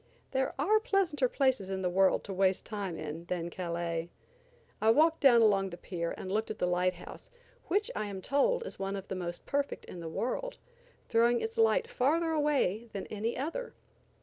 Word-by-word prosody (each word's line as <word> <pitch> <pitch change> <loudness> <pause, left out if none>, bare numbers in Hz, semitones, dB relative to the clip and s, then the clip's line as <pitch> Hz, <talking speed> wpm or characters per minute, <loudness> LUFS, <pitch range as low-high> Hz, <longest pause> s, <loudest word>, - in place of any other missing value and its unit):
There 265 0 0
are 415 +10 +3
pleasanter 365 - +1
places 260 -9 +1
in 190 0 -3
the - - +2
world 190 +1 +3
to 195 - -5
waste 190 0 +1
time 200 -6 -4
in 155 +2 -6
than 175 -1 -3
Calais. 170 -1 -3 0.7
I 220 - +4
walked 315 +7 +4
down 240 -4 +6
along 195 -3 +3
the 175 - -8
pier 170 -2 -4
and 185 - -6
looked 220 +2 0
at 215 - -4
the - - 0
light 180 +1 +1
house, 175 - -11 0.4
which 415 +6 +1
I 210 - -2
am 195 -2 -5
told 470 - +1
is - - -8
one 195 0 -2
of 195 -1 -7
the - - -2
most 175 -1 -5
perfect 285 0 -2
in 180 - -9
the 165 -1 -5
world, 380 - -3 0.5
throwing 235 +1 +3
its 450 +1 -4
light 455 +1 +3
farther 330 - +1
away 280 - +1
than 195 - -4
any 220 +2 -2
other. 330 - -4
215 Hz, 195 wpm, -31 LUFS, 185-295 Hz, 0.7 s, down